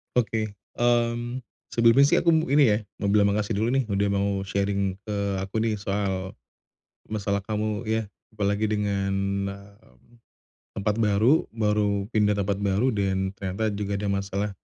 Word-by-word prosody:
Oke, 110 -2 +1 0.3
mmm, 120 +1 +1 0.3
sebelumnya 115 +4 +6
sih - - +3
aku 170 - +2 0.2
ini 145 -5 +6
ya 105 - +3 0.2
mau 100 - +1
bilang 100 -1 +4
makasih 105 0 -1
dulu 115 +4 +1
nih 135 -1 +2
udah 100 0 +1
mau 100 0 +1 0.2
sharing 100 -1 0
ke 105 -1 -5 0.3
aku 95 +3 -4
nih 110 0 +1
soal, 100 -2 -3 0.7
masalah 100 -2 -1
kamu 105 +1 -2
ya 110 -1 -1 0.2
apalagi 105 0 0
dengan, 100 -2 0 0.4
mmm, 100 - -15 0.6
tempat 105 +3 0
baru 110 +8 +3
baru 105 -2 0
pindah 105 -1 +2
tempat 100 0 -1
baru 105 +6 +1
dan 95 -1 -1
ternyata 100 +2 -2
juga 100 0 -2
ada 100 0 -2
masalah, 100 +1 -2
105 Hz, 150 wpm, -25 LUFS, 100-110 Hz, 0.7 s, sebelumnya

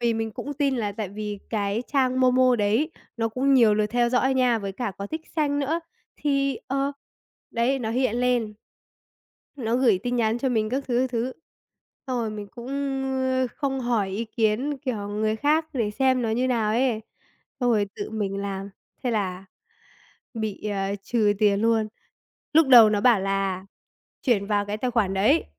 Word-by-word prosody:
vì 235 -1 +1
mình 225 0 -2
cũng 290 +6 -6
tin 275 -2 +1
là 205 -3 -2
tại 210 -2 -4
vì 210 0 -5
cái 205 0 -1
trang 260 -2 +2
MoMo 255 -1 +4
đấy 220 +10 +1 0.3
nó 225 -1 0
cũng 270 +4 +2
nhiều 225 -5 +6
lượt 210 0 +1
theo 240 +2 +1
dõi 255 +2 +2
nha, 250 -3 +3
với 195 -2 -5
cả 215 -1 -3
có 200 - -4
tick 315 +7 -6
xanh 290 -2 +1
nữa, 310 +4 0 0.4
thì, 275 -2 0
ờ, 275 +1 -1 0.6
đấy, 250 +3 +1
nó 225 -3 -3
hiện 245 -1 +1
lên. 240 -4 +1 1.0
Nó 235 -2 0
gửi 230 -8 +3
tin 245 0 -1
nhắn 225 0 +1
cho 265 +2 0
mình 220 -3 +1
các 270 +3 -2
thứ, 245 -1 +1
các 260 0 0
thứ, 245 +1 -1 0.7
xong 255 -2 -1
rồi 220 -2 -2
mình 210 -1 -6
cũng, 240 +2 -10 0.5
ơ, 260 -1 +1
không 270 -2 -1
hỏi 235 -5 0
ý 210 +5 -2
kiến, 230 +6 0
kiểu, 225 -7 -4
người 215 +1 -1
khác 305 +5 +2
để 230 -7 -1
xem 260 +2 +2
nó 225 - 0
như 250 +3 +1
nào 225 -4 +1
ấy, 240 -1 +1 0.6
xong 245 -1 +2
rồi 210 -3 +2
tự - - -5
mình 205 -3 -2
làm, 200 0 -4 0.3
thế 245 - +1
là 195 -4 -2 0.9
bị, 220 -3 -3
à, 195 -1 -1
trừ 215 -1 +2
tiền 205 -2 +3
luôn. 225 -1 +2 0.6
Lúc 315 -2 +5
đầu 230 -4 +9
nó 205 - +1
bảo 235 -6 +5
là 195 -1 -1 0.6
chuyển 210 -7 +2
vào 205 -1 0
cái 205 +1 -3
tài 250 +2 -1
khoản 200 -5 +1
đấy 245 +12 +3
230 Hz, 190 wpm, -25 LUFS, 210-260 Hz, 1.0 s, đầu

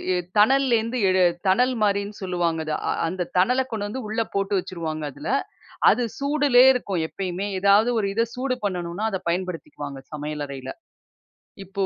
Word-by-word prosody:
எ - - +1 0.2
தணல்லேருந்து 245 -1 +3
எடு 185 0 +3 0.3
தணல் 250 +7 +3
மாரின்னு 200 0 0
சொல்லுவாங்க 175 -3 -1
அத. 155 - -1 0.3
அந்த 180 +1 -3
தணல 250 +8 +3
கொண்டு 205 -2 -3
வந்து 255 0 -5
உள்ள 225 +1 0
போட்டு 200 +1 0
வச்சுருவாங்க 160 -4 -5
அதில. - - -7 0.6
அது 245 +4 +1 0.2
சூடுலேயே 280 -3 +5
இருக்கும் 195 -9 -2
எப்பயுமே. 185 +2 -4
ஏதாவது 200 +4 +5
ஒரு 200 - 0
இத 230 +3 +2
சூடு 255 0 -1
பண்ணணுன்னா 180 +1 -3
அத 190 - -2
பயன்படுத்திக்குவாங்க 165 -6 -4
சமையல் 150 0 -4
அறையில. 135 -2 -7 1.0
இப்போ 195 +1 -2
195 Hz, 145 wpm, -24 LUFS, 175-230 Hz, 1.0 s, சூடுலேயே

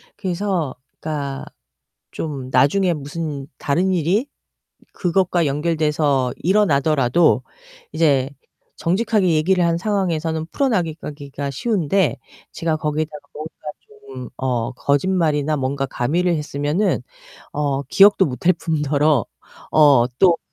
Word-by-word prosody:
그래서 185 -6 -2 0.2
그러니까 140 -3 -4 0.7
좀 140 -5 -5
나중에 180 +8 +3
무슨 145 -1 -5
다른 180 +7 +1
일이 185 - +1 0.7
그것과 180 -2 +1
연결돼서 150 -3 +1
일어나더라도 155 - +3 0.5
이제 140 -5 +2 0.5
정직하게 200 +2 +1
얘기를 175 +4 +2
한 170 0 +1
상황에서는 170 -5 -1
풀어나가기가 155 - -2
쉬운데 190 - 0 0.3
제가 165 -1 -1
거기에다가 150 0 -3
뭔가 155 +2 -6 0.3
좀 - - -39 0.5
어 125 -3 -1
거짓말이나 150 +1 +1
뭔가 135 0 -1
가미를 170 +9 0
했으면은 150 +6 -1 0.5
어 140 -2 -1
기억도 200 +3 +5
못할 160 +7 +1
뿐더러 150 - +1 0.5
어 140 -6 +6
또 175 -3 +5
155 Hz, 265 characters per minute, -20 LUFS, 140-180 Hz, 0.7 s, 어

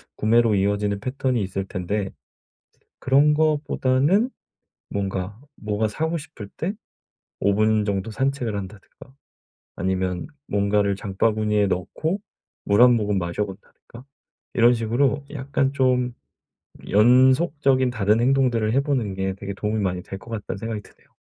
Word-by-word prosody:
구매로 115 0 +3
이어지는 100 +1 0
패턴이 130 0 -1
있을 95 0 -3
텐데. 95 +2 -3 0.9
그런 140 +3 +4
것보다는 150 - +2 0.6
뭔가 100 0 -3 0.2
뭐가 105 +1 -1
사고 160 +10 -2
싶을 140 -9 -10
때 175 +5 -2 0.7
5 100 - +3
분 110 +1 +2
정도 100 +1 -2
산책을 130 -3 -1
한다든가. 100 +6 -10 0.6
아니면 95 -1 -1 0.2
뭔가를 100 0 +1
장바구니에 105 +1 +1
넣고 155 - -2 0.5
물 100 +3 +3
1 125 -1 +8
모금 105 -3 0
마셔 85 +4 -2
본다든가. 105 +5 -13 0.5
이런 120 +1 +6
식으로 120 +5 0
약간 135 -1 -1
좀 125 -2 +1 0.8
'연속적인 130 - +4
다른 110 -2 +2
행동들을 125 -4 +2
해 135 - +3
보는 130 -8 -1
게 95 0 -2
되게 100 +1 -6
도움이 105 +2 -2
많이 90 -2 -1
될 95 - -8
것 115 - -14
같다.'는 105 -4 -4
생각이 110 0 -4
드네요. - - -23
110 Hz, 285 characters per minute, -23 LUFS, 100-130 Hz, 0.9 s, 1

